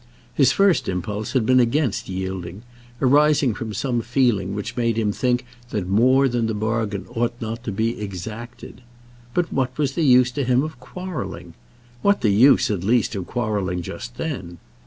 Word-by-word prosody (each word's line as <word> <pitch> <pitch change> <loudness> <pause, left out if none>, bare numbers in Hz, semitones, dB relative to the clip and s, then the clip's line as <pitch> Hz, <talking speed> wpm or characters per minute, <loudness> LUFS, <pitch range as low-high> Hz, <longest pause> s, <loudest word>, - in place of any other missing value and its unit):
His 135 -3 +4
first 195 +1 +3
impulse 105 +5 -3
had 130 -5 +2
been 130 +2 +5
against 125 -2 +1
yielding, 95 +1 -5 0.4
arising 145 -1 +4
from 110 +2 -5
some 120 +3 -1
feeling 115 -6 +1
which 105 - -5
made 115 -2 0
him 110 -2 +1
think 125 +3 0 0.2
that 105 -6 -3
more 130 +7 +4
than 120 -2 0
the 110 - -2
bargain 110 -2 -2
ought 120 0 -1
not 115 +1 -5
to 105 - -2
be 110 +2 -1
exacted. 110 +6 -8 0.5
But 175 -1 0
what 130 -1 -1
was 145 -3 +1
the 165 - -1
use 125 -4 +5
to 140 +2 -2
him 125 +1 +2
of 155 +1 -6
quarrelling? 130 - -7 0.5
What 200 0 +3
the 105 - +3
use, 120 +4 +5
at 95 -4 -2
least, 115 +4 +2
of 95 -4 -4
quarrelling 100 -7 -2
just 120 +7 -8
then? 95 - -5
115 Hz, 175 wpm, -22 LUFS, 105-130 Hz, 0.5 s, been